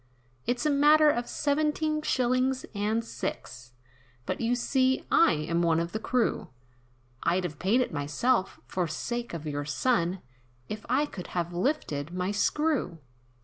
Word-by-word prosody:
"It's 245 +4 0
a 300 - +3
matter 300 +2 +6
of 240 -3 -3
seventeen 305 +1 0
shillings 255 -1 +1
and 215 +2 0
six, 125 - -6 0.5
But - - -3
you 235 +2 +2
see, 260 +1 +1
I 335 - +6
am 160 +3 -1
one 165 -1 +3
of 170 +1 -2
the 220 - -3
crew, 245 +1 0 0.7
I'd 180 +2 +1
have 155 -5 -5
paid 220 +7 +3
it 245 - -2
myself, 185 - 0
for 180 -2 -2
sake 240 +9 -4
of 165 -2 -6
your 145 -1 -2
son, 175 - 0 0.4
If 215 +1 -7
I 270 +5 +3
could 185 -11 -8
have 175 0 -1
lifted 175 - -1
my 185 +2 -1
screw." 290 - 0
225 Hz, 150 wpm, -28 LUFS, 170-260 Hz, 0.7 s, matter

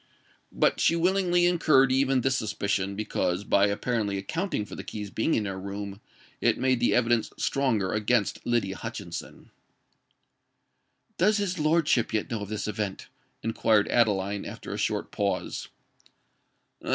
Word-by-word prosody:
But - - +2
she 165 - +3
willingly 175 0 +2
incurred 155 -7 +4
even 135 0 +2
this 135 +1 +1
suspicion, 100 -3 -1
because, 100 -3 -1
by 100 0 +3
apparently 105 0 -1
accounting 155 - -2
for - - -11
the - - -6
keys 105 -2 -6
being 115 +9 +1
in 105 - 0
her 95 -1 -4
room, 100 +1 -6 0.4
it - - +3
made 130 -2 +2
the 120 - +2
evidence 120 -2 +2
stronger 115 -9 0
against 105 0 0
Lydia 105 -6 0
Hutchinson. 100 -7 -7 1.7
"Does 210 +4 +4
his 190 -4 -2
lordship 155 -7 +2
yet 110 - -2
know 110 -3 -2
of 100 - -6
this 105 -1 -3
event?" 105 -2 -4 0.3
inquired 110 -1 +2
Adeline, 100 -4 +1
after - - -7
a - - -4
short - - -1
pause. - - -2
110 Hz, 140 wpm, -27 LUFS, 100-135 Hz, 1.7 s, incurred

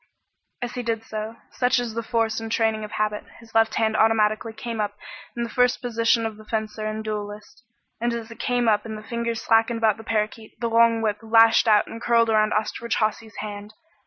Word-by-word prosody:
As 240 - -3
he 250 - -3
did 225 -2 -2
so 220 0 -5 0.2
such 250 +1 +2
is 240 -2 -2
the 230 - -2
force 225 -1 0
and 225 0 -6
training 220 -1 +1
of 210 - -8
habit 210 0 -1 0.2
his 230 -1 -17
left 225 0 +3
hand 220 -1 +1
automatically 220 0 +2
came 225 0 -4
up 205 0 -3 0.4
in 235 - -1
the - - -2
first 250 0 +2
position 230 -1 +1
of 220 -1 -4
the 215 - -14
fencer 215 -1 -3
and 215 0 -3
the - - -9
duelist, 210 0 -6 0.4
and 240 +1 0
as 230 -1 -5
it 230 - -11
came 245 -1 0
up 210 -2 +3
and 220 -1 -6
the 215 - -10
fingers 235 0 -3
slackened 225 +1 +3
about 220 -2 +2
the 225 - -10
parakeet, 220 0 -3
the 235 -1 -2
long 230 0 +4
whip 210 -1 0
lashed 225 +1 +5
out 210 -1 +5
and 225 - -9
curled 230 -1 +3
around 215 0 +3
Osterbridge 220 +2 -1
Hawsey's 220 0 -1
hand. 210 0 -7
225 Hz, 220 wpm, -24 LUFS, 215-230 Hz, 0.4 s, lashed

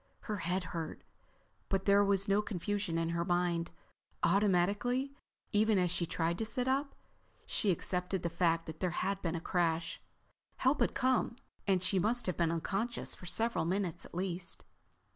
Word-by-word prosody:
Her 210 -2 -3
head 180 +1 -1
hurt 165 -2 -4 0.7
but 195 -1 0
there 200 0 +6
was 200 0 +2
no 200 +1 +4
confusion 205 -2 -2
in 165 0 0
her 170 0 0
mind. 175 -1 +1 0.5
Automatically, 205 +8 +2 0.4
even 215 0 +4
as 180 -2 +2
she 175 -1 0
tried 170 +1 -1
to - - 0
sit 245 +3 -1
up, 275 +2 0 0.5
she 210 - +1
accepted 180 +1 0
the - - +1
fact 165 -1 +2
that 160 0 -8
there 185 - +1 0.2
had 195 0 -1
been 165 -1 -1
a - - -1
crash, 165 -1 0 0.6
help 265 +3 +2
had - - +2
come, 255 -2 +2 0.3
and 185 -2 +3
she 185 +1 +2
must 225 +5 +1
have 185 - 0
been 170 -1 +2
unconscious 200 +8 -1
for 180 - -11
several 225 -3 +1
minutes 180 0 -1
at - - -12
least. 180 -1 -3
185 Hz, 170 wpm, -33 LUFS, 170-205 Hz, 0.7 s, there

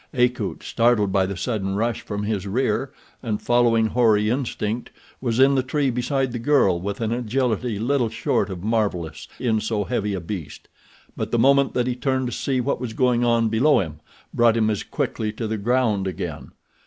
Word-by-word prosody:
Akut, 125 0 0
startled 115 -4 +2
by 95 -1 +2
the 95 -1 -5
sudden 95 -1 -2
rush 115 +2 -1
from 105 0 -4
his 105 -2 -2
rear, 130 +5 0 0.3
and 110 -4 -2
following 120 -2 +3
hoary 110 -2 +3
instinct, 120 -3 -2 0.3
was 120 -2 -1
in 135 +1 +6
the 135 - +3
tree 135 +1 0
beside 130 +2 -1
the 120 - -4
girl 115 -9 +3
with 100 +4 -4
an 110 -1 -1
agility 120 -1 -1
little 120 +2 +1
short 105 -2 0
of 90 -2 -6
marvelous 100 -7 -1
in 115 -3 +1
so 110 -1 -1
heavy 105 -3 -2
a - - -3
beast. 85 -4 -7 0.5
But - - -3
the 120 - 0
moment 140 +3 +4
that 125 - +1
he 125 -1 -1
turned 130 0 0
to - - -6
see 130 +2 -1
what 120 - -1
was 120 -3 -4
going 125 0 +2
on 115 -1 +2
below 130 +7 +4
him 80 -5 -4 0.3
brought 115 -1 +4
him 110 -1 +2
as 105 - -2
quickly 110 -1 -3
to 110 +1 -4
the 110 0 -2
ground 110 -3 +1
again. 90 - -6
115 Hz, 190 wpm, -23 LUFS, 105-125 Hz, 0.5 s, in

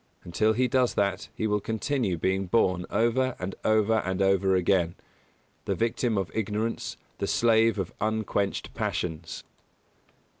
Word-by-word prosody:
Until 110 +6 +1
he 125 +3 +2
does 125 0 +1
that 100 -1 0
he - - -2
will 105 -1 +1
continue 110 -2 -1
being 95 +3 0
born 90 -3 +1
over 125 +3 +1
and 95 +1 -4
over 110 0 +3
and 95 -2 -2
over 95 -1 +3
again 90 -1 +2 0.7
the - - 0
victim 115 0 0
of 95 -2 -2
ignorance, 110 +1 -2 0.2
the - - -1
slave 115 -1 +3
of 95 -3 -3
unquenched 110 -2 -1
passions. 80 -1 -3
105 Hz, 140 wpm, -27 LUFS, 95-115 Hz, 0.7 s, over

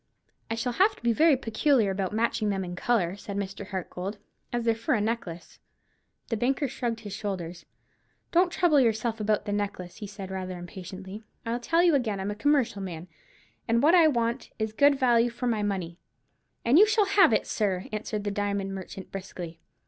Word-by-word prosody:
"I 225 - -1
shall 245 +2 -2
have 395 - +3
to - - -20
be 235 -1 +3
very 310 +2 +5
particular 225 -2 +2
about 190 -1 -2
matching 220 -1 0
them 195 -2 -1
in 175 0 -6
colour," 190 -3 +1
said 200 0 -7
Mr. 195 0 -4
Hartgold, 190 +1 -5 0.3
"as 240 -1 -2
they're 230 - +4
for 225 +1 0
a - - +1
necklace." 205 -6 -4 0.7
The 230 - 0
banker 270 +5 +1
shrugged 240 -3 -3
his 205 -3 -7
shoulders. 185 -5 -5 0.6
"Don't 350 +1 +4
trouble 340 -6 +4
yourself 230 -1 +1
about 210 -1 0
the 205 - -3
necklace," 200 -3 -3
he 210 - -6
said, 195 -1 -8
rather 185 -1 -4
impatiently. 190 +3 -8 0.2
"I 230 +1 -1
tell 330 +8 +2
you 345 -2 +5
again 225 -8 0
I'm 195 +2 -2
a - - -4
commercial 265 -5 +1
man, 175 -2 -6 0.6
and 235 +2 +2
what 315 +4 +6
I 340 -3 +7
want 235 -3 0
is 220 -1 -2
good 285 +5 +5
value 240 -3 +4
for 240 +2 -5
my 225 -3 +1
money." 185 -4 -3 0.7
"And 255 +8 +6
you 425 - +8
shall 430 -1 +3
have 390 - +5
it, 215 - +2
sir," 190 -3 -1
answered 215 -1 -3
the 205 - -2
diamond 200 -1 -2
merchant, 190 0 -8
briskly. 180 -4 -7
215 Hz, 195 wpm, -27 LUFS, 195-245 Hz, 0.7 s, you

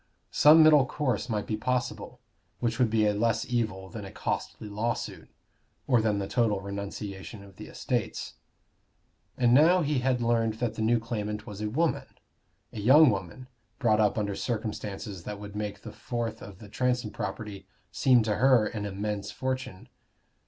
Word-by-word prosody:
Some 155 +2 +7
middle 150 -4 +6
course 130 -4 -2
might 105 -2 -1
be 110 - -2
possible, 125 +3 -3 0.4
which 115 0 -1
would 125 -3 +3
be 110 -1 +2
a 105 - +2
less 115 +2 0
evil 110 -6 -2
than 105 +2 -8
a 95 - -8
costly 110 - -4
lawsuit, 110 +3 -4 0.6
or 125 -4 +3
than 110 -2 +1
the 100 -1 -3
total 110 -4 +1
renunciation 100 +1 -7
of 95 -2 -16
the - - -9
estates. - - -3 1.0
And 120 -1 +3
now 165 +6 +5
he 145 -2 0
had 125 0 +1
learned 115 -2 +1
that 120 0 -2
the - - -5
new 115 +2 +3
claimant 105 -2 -4
was 105 0 -8
a 105 - -1
woman 160 +8 0 0.7
a - - -6
young 135 +6 +7
woman, 100 +6 -6 0.3
brought 110 -5 +2
up 105 0 +2
under 100 -2 -1
circumstances 105 -3 -4
that 105 -1 -6
would 105 0 -9
make 105 -1 -5
the - - -8
fourth 115 -2 -4
of 100 -2 -10
the 105 - -12
Transome 125 0 -1
property 105 -3 -6 0.2
seem 125 -4 +4
to 105 -2 -1
her 125 -2 +5
an 105 -1 -4
immense 100 +1 -4
fortune. 130 -4 -4
110 Hz, 170 wpm, -28 LUFS, 105-125 Hz, 1.0 s, Some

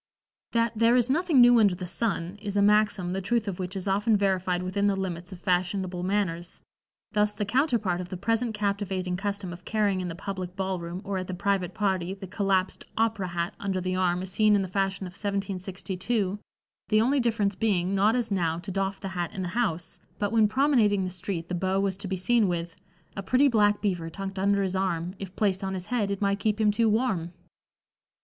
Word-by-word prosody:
That 230 0 +2
"there 230 +2 +4
is 250 0 +3
nothing 320 -3 +4
new 240 -1 +7
under 200 -4 +4
the 180 0 -6
sun" 180 -2 -2
is 205 -1 -3
a - - +4
maxim 205 -3 +3
the 195 - -2
truth 220 +3 0
of 190 -2 -4
which 185 +1 -4
is 190 0 -3
often 205 +3 +3
verified 185 -2 0
within 200 +2 0
the 200 - +2
limits 180 -2 -4
of 185 - -9
fashionable 180 0 0
manners; 180 -3 -2 0.5
thus 210 -1 +1
the 205 - -2
counterpart 225 - +1
of 180 - -8
the 185 - -5
present 225 +3 0
captivating 195 -3 -1
custom 200 -1 -3
of 175 +1 -11
carrying 205 -3 0
in 180 - -3
the 165 - -5
public 185 -1 -5
ball 190 -1 -2
room 170 +2 -6
or 195 -1 -2
at 185 - -5
the 185 - -4
private 190 -1 -1
party 190 -3 0
the 195 0 -8
collapsed 190 -1 0
"opera" 220 -4 +1
hat 170 0 -2
under 195 -2 -1
the 185 0 -2
arm 180 -1 +1
is 190 - -4
seen 215 +2 +4
in 200 - +2
the - - -3
fashion 195 +1 -1
of 180 - -7
1762, 195 +1 -2 0.5
the 215 - +4
only 265 +6 +3
difference 225 -4 +1
being, 190 -3 0
not 205 +4 +3
as 235 -3 -1
now, 165 -4 +1
to 185 +3 -6
doff 195 +1 -2
the 195 - -5
hat 175 -2 -3
in 190 - -3
the 180 - -3
house, 175 -6 -2 0.2
but 205 -1 -1
when 220 -2 +4
promenading 220 -5 +3
the 185 - -4
street 180 -2 -4
the 180 - -5
beau 190 +2 0
was 195 -1 0
to 200 +1 -6
be 190 0 -2
seen 225 +3 +3
with 170 -1 -3 0.4
"A - - -3
pretty 255 +9 +3
black 210 -4 +3
beaver 175 -5 -1
tucked 195 +2 -6
under 200 +1 +2
his 190 -1 -2
arm, 180 -2 -1
If 195 -1 -7
placed 195 -3 +1
on 190 0 -2
his 180 -1 -5
head 210 -2 0
it 200 0 -3
might 200 0 +1
keep 215 +1 0
him 215 -1 +4
too 225 +1 +2
warm." 210 -7 0
195 Hz, 220 wpm, -27 LUFS, 185-210 Hz, 0.5 s, new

